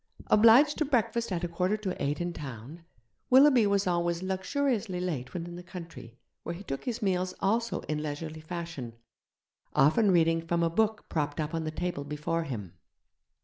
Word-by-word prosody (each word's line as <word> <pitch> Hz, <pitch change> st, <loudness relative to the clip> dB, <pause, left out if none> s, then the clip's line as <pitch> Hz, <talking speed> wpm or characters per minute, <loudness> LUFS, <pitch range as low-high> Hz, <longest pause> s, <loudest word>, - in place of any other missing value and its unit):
Obliged 230 Hz, +8 st, +6 dB
to -, -, +3 dB
breakfast 235 Hz, -4 st, 0 dB
at 175 Hz, -1 st, -2 dB
a -, -, +1 dB
quarter 180 Hz, +5 st, 0 dB
to 195 Hz, -4 st, -3 dB
eight 145 Hz, +1 st, -1 dB
in 175 Hz, 0 st, -2 dB
town, 140 Hz, +3 st, -8 dB, 0.5 s
Willoughby 260 Hz, -4 st, +6 dB
was 200 Hz, 0 st, +2 dB
always 175 Hz, -1 st, 0 dB
luxuriously 195 Hz, +1 st, -1 dB
late 150 Hz, -9 st, -3 dB
when 170 Hz, -1 st, -3 dB
in 175 Hz, 0 st, -8 dB
the -, -, -7 dB
country, 170 Hz, -9 st, -10 dB, 0.2 s
where 170 Hz, -, -5 dB
he 190 Hz, -, -9 dB
took 135 Hz, -7 st, -5 dB
his 245 Hz, -2 st, -3 dB
meals 185 Hz, -1 st, 0 dB
also 230 Hz, +4 st, 0 dB
in 150 Hz, 0 st, -3 dB
leisurely 155 Hz, +1 st, -5 dB
fashion, 165 Hz, -7 st, -6 dB, 0.8 s
often 160 Hz, +10 st, +4 dB
reading 165 Hz, -2 st, +3 dB
from 170 Hz, +1 st, 0 dB
a 165 Hz, -, +1 dB
book 215 Hz, +3 st, 0 dB
propped 150 Hz, -2 st, -2 dB
up 155 Hz, 0 st, -2 dB
on 165 Hz, -1 st, -2 dB
the -, -, -1 dB
table 155 Hz, -1 st, -3 dB
before 150 Hz, +3 st, -2 dB
him. 105 Hz, -, -6 dB
175 Hz, 180 wpm, -29 LUFS, 155-205 Hz, 0.8 s, Obliged